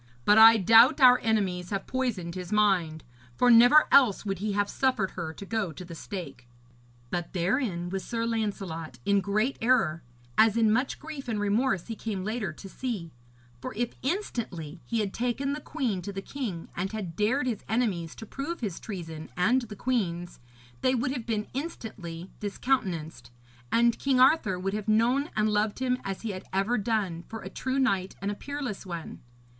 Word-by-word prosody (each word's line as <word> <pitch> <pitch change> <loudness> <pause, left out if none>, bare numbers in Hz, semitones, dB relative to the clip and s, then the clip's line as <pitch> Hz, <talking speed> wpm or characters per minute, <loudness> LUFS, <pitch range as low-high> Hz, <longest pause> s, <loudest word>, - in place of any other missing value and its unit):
But 210 +1 +6
I 225 +1 +10
doubt 230 - +6
our 250 -2 +8
enemies 190 -6 0
have 195 -1 -3
poisoned 230 -10 -2
his 180 +1 -7
mind, 185 -7 +2 0.3
for 245 - +4
never 245 +6 +7
else 245 -7 +5
would 195 -3 -2
he 210 +1 -2
have 205 0 +1
suffered 255 -8 0
her 170 -3 -5
to 200 - -9
go 220 -4 -2
to 180 +4 -9
the 170 - -9
stake.' 140 -8 -7 0.6
But 175 -1 -3
therein 180 -1 0
was 195 0 -3
Sir 230 -1 -2
Lancelot 195 - -3
in 200 -1 +3
great 215 +7 0
error, 225 -10 +2 0.4
as 220 0 +5
in 220 -2 +4
much 255 +5 0
grief 300 -3 -8
and 220 -3 -1
remorse 205 -2 +1
he 225 - -5
came 205 -3 -4
later 215 -3 -2
to 175 +5 -11
see; 195 -6 -5 0.5
for - - -6
if 240 +1 -2
instantly 215 - -3
he 230 -2 -1
had 200 -2 -3
taken 250 +4 -1
the 300 - -5
queen 225 -10 -2
to 200 - -5
the 195 0 -6
king, 210 -13 -5
and 185 +2 -2
had 190 -7 -5
dared 245 +9 +1
his 235 -5 -2
enemies 200 -8 -1
to 225 - -9
prove 280 +9 -5
his 200 -7 -3
treason 165 -6 -7
and 235 +9 +3
the 220 -3 -8
queen's, 180 -8 -2 0.4
they 255 - +3
would 255 +1 0
have 250 -4 -5
been 215 -2 -1
instantly 195 - -6
discountenanced, 195 - -2 0.4
and 235 0 +3
King 270 -2 +2
Arthur 255 - +4
would 195 +2 -3
have 210 0 -4
known 240 +7 +2
and 215 0 +2
loved 210 0 +1
him 250 -1 0
as 195 +1 -5
he 225 - -2
had 185 0 -7
ever 195 +6 +1
done, 200 -6 -1
for 225 - -6
a - - -7
true 260 +1 -2
knight 195 -8 +1
and 200 +1 -2
a - - -2
peerless 275 -2 -5
one. 170 -4 -7
210 Hz, 185 wpm, -28 LUFS, 185-245 Hz, 0.6 s, I